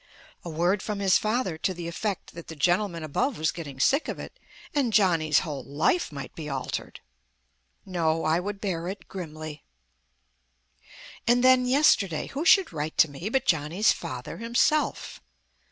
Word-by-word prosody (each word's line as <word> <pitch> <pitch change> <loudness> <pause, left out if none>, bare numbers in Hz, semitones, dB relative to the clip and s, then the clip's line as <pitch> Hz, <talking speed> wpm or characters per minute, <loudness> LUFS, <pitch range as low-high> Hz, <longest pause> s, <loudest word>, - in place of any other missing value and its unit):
A 175 - -6
word 175 +5 +1
from 210 -2 -3
his 195 -2 +4
father 215 -7 -1
to 185 +1 -1
the 170 -1 -6
effect 195 +3 -4
that 170 0 -10
the 160 - -8
gentleman 175 +2 +1
above 205 - -1
was 155 +1 +1
getting 145 -6 -8
sick 280 - +3
of - - -4
it, - - -10 0.3
and 275 -6 +1
Johnny's 165 -7 +3
whole 145 -7 -5
life 150 - 0
might 140 -3 -7
be 155 -2 -7
altered. 135 -2 -5 0.8
No, 165 -3 0
I 160 +2 +2
would 200 +2 -5
bear 175 -4 -3
it 195 +2 -7
grimly. 155 -4 -7 1.6
And 245 +1 +4
then, 255 -1 +5
yesterday, 230 - +3
who 290 +4 -4
should 370 - +5
write 155 0 -4
to 155 - +5
me 165 +9 -5
but 265 +2 0
Johnny's 165 - +2
father 125 -1 -5
himself. 235 +6 0
175 Hz, 160 wpm, -26 LUFS, 155-215 Hz, 1.6 s, then